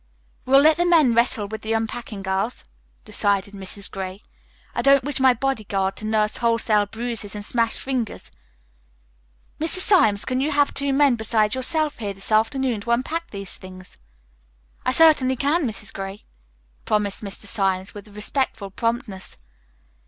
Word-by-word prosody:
"We'll 270 +1 +6
let 310 +1 +5
the 350 - +2
men 315 -8 +5
wrestle 235 -2 +2
with 220 +1 -7
the 220 +1 -2
unpacking, 225 -2 -4
girls," 190 +5 -2 0.4
decided 200 0 0
Mrs. 195 0 -7
Gray. 190 +1 -6 0.5
"I - - -1
don't 275 -1 +5
wish 290 +1 -2
my 260 -1 +5
body 270 -2 -1
guard 195 -1 -1
to 215 - -6
nurse 215 -1 +1
wholesale 230 -3 +2
bruises 225 -2 -5
and 205 0 -4
smashed 230 0 0
fingers. 255 -5 -4 1.3
Mr. 320 +4 +4
Symes, 285 - +4
can 255 0 -1
you 290 - 0
have 285 0 +2
two 280 0 0
men 270 -3 +4
besides 220 -1 +1
yourself 300 +3 0
here 205 -3 -3
this 195 +3 -7
afternoon 225 +1 +1
to 235 - -8
unpack 305 +8 -1
these 195 -2 -5
things?" 185 -1 -13 0.9
"I - - +4
certainly 280 -4 +5
can, 285 +4 +1
Mrs. 215 -2 -7
Gray," 195 +1 -7 0.6
promised 210 -1 -1
Mr. 200 0 -7
Symes 190 -2 -1
with 205 0 -10
respectful 210 0 -3
promptness. 230 -3 -3
225 Hz, 155 wpm, -23 LUFS, 205-265 Hz, 1.3 s, We'll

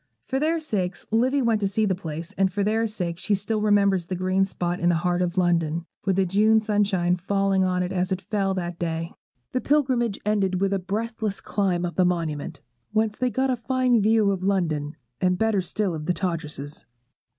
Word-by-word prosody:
For 265 - -1
their 320 +3 +1
sakes 195 - -3
Livy 255 +5 +2
went 225 -2 +2
to 200 - +2
see 215 +3 +1
the 195 - +1
place; 165 0 -6
and 195 -1 +2
for 200 +2 -1
their 220 +2 +1
sakes 180 -5 -4
she 205 +2 +1
still 210 +2 -2
remembers 200 -4 +3
that 185 - -3
green 185 +1 +1
spot 175 -2 -3
in 175 - +2
the 175 - +3
heart 175 +1 0
of 180 +1 -1
London, 170 -2 +1 0.2
with 195 -2 +2
the 195 0 +2
June 215 +4 +4
sunshine 200 -5 +1
falling 195 +1 +1
on 180 -1 +1
it 180 - -3
as 185 0 -1
it 185 - 0
fell 195 -1 -1
that 175 -2 -4
day. 165 0 -3 0.4
The 255 - -1
pilgrimage 255 -7 +1
ended 195 -3 +1
with 195 0 +1
a 195 - +1
breathless 215 +2 -3
climb 185 -4 0
up 175 - -5
the 185 - +5
Monument, 160 -4 -2 0.3
whence 215 0 0
they 255 -1 +2
got 260 +2 0
a - - +1
fine 250 -1 +1
view 215 -1 +3
of 190 -2 -2
London, 165 -6 0 0.3
and 180 0 +2
better 220 -2 +2
still 190 +1 -2
of 155 -1 -5
Todgerses. 165 - -3
195 Hz, 205 wpm, -25 LUFS, 175-215 Hz, 0.4 s, the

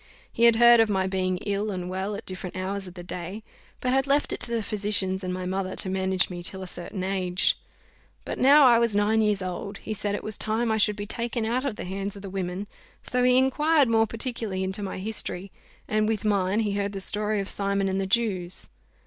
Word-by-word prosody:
He 235 - +3
had 235 -1 +7
heard 235 0 +7
of 225 -1 +4
my 190 -2 +1
being 185 -1 -1
ill 205 +1 -1
and 180 -3 -4
well, 190 +3 -3
at 215 - -8
different 185 -1 -6
hours 190 +1 -3
of 180 - -11
the 175 - -8
day; 180 +4 -6 0.4
but 250 0 0
had 270 +1 +2
left 285 +1 +2
it - - -4
to 235 - 0
the 230 -2 0
physicians 200 -2 0
and 180 - -2
my 185 0 -4
mother 185 0 -2
to 185 - -1
manage 190 -1 +1
me 175 -1 -7
till 190 +2 -4
a - - -7
certain 180 +2 -6
age: 185 -1 +1 0.7
but - - -4
now 285 +2 +7
I 240 -2 +6
was 230 -3 +1
nine 210 +2 +3
years 210 -3 +1
old, 185 +2 -5
he 220 - -5
said 205 -1 -2
it - - -5
was 215 -1 -4
time 225 +1 0
I 220 - +1
should 210 0 +3
be 205 0 -5
taken 235 +1 -3
out 250 +4 -1
of 260 -6 -2
the - - -6
hands 195 +2 -4
of 200 - -10
the 195 - -7
women; 185 +1 -3 0.4
so 250 - -1
he 250 0 +5
inquired 285 +1 +3
more 225 -1 +3
particularly 225 -5 -3
into 190 +2 -3
my 195 -2 -4
history, 195 -2 -3 0.4
and, 215 0 +1
with 220 -1 -1
mine, 200 0 +2
he 210 -2 -1
heard 200 0 -2
the 195 - -4
story 210 +2 +1
of 195 - -3
Simon 200 -1 +1
and 190 0 0
the 190 - -2
Jews. 190 -4 0
200 Hz, 235 wpm, -26 LUFS, 190-225 Hz, 0.7 s, had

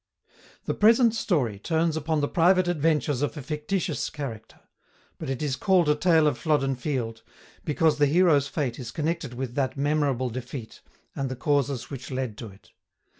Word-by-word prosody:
The - - -1
present 230 +2 +5
story 140 - 0
turns 160 +6 0
upon 160 0 -1
the 145 - +1
private 180 +3 +3
adventures 150 -5 +1
of 145 +2 -2
a - - -4
fictitious 155 +3 -2
character; 125 -8 -7 0.6
but 155 - -5
is 135 0 -1
called 185 +1 +3
a - - +6
Tale 160 +1 +3
of 140 -6 +1
Flodden 140 -4 +1
Field, 125 -4 -3 0.4
because 155 -1 +2
the 145 - +5
hero's 155 -3 +4
fate 140 -5 -3
is 120 -3 -6
connected 155 -3 -3
with 125 -1 -4
that 135 0 -1
memorable 140 -3 0
defeat, 125 -1 -7 0.3
and 135 -1 -2
the 130 - -4
causes 140 -1 -1
which 130 -2 -7
led 130 -4 -3
to 115 - -6
it. 95 -1 -17
145 Hz, 170 wpm, -26 LUFS, 130-160 Hz, 0.6 s, a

